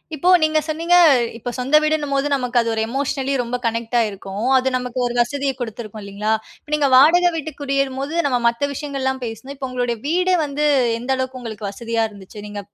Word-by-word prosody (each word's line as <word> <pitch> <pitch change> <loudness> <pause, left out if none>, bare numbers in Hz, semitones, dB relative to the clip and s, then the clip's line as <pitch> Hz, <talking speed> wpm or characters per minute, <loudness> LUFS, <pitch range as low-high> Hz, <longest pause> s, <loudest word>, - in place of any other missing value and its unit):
இப்போ 345 +5 +1
நீங்க 310 0 +3
சொன்னிங்க. 330 +3 +1 0.4
இப்ப 245 +2 -5
சொந்த 265 +4 +1
வீடுன்னும்போது, 290 -2 0
நமக்கு 250 -2 0
அது 230 - -2
ஒரு 220 - 0
எமோஷனலி 275 +1 -2
ரொம்ப 240 +1 -3
கனெக்டாயிருக்கும். 225 -2 -1
அது 260 0 0
நமக்கு 250 0 -4
ஒரு 240 - -4
வசதிய 275 +3 -1
கொடுத்துருக்கும் 220 -2 -6
இல்லிங்களா? 200 +2 -2 0.3
இப்ப - - -22
நீங்க 290 -2 +2
வாடகை 340 +7 +6
வீட்டு 315 -1 -4
குடியேறும்போது, 275 +1 -1
நம்ம 250 -3 +1
மத்த 235 +5 0
விஷயங்கள்லாம் 265 -2 -3
பேசுணும். 230 +5 -7
இப்போ, 265 -1 -4
உங்களுடைய 245 -2 -2
வீடு 365 +3 +2
வந்து, 295 +1 -2 0.3
எந்த 250 +3 -3
அளவுக்கு 260 0 -4
உங்களுக்கு 220 -3 -5
வசதியாக 230 +1 -1
இருந்துச்சு? 200 +1 -12
நீங்க 205 0 -6
260 Hz, 175 wpm, -20 LUFS, 230-285 Hz, 0.4 s, வாடகை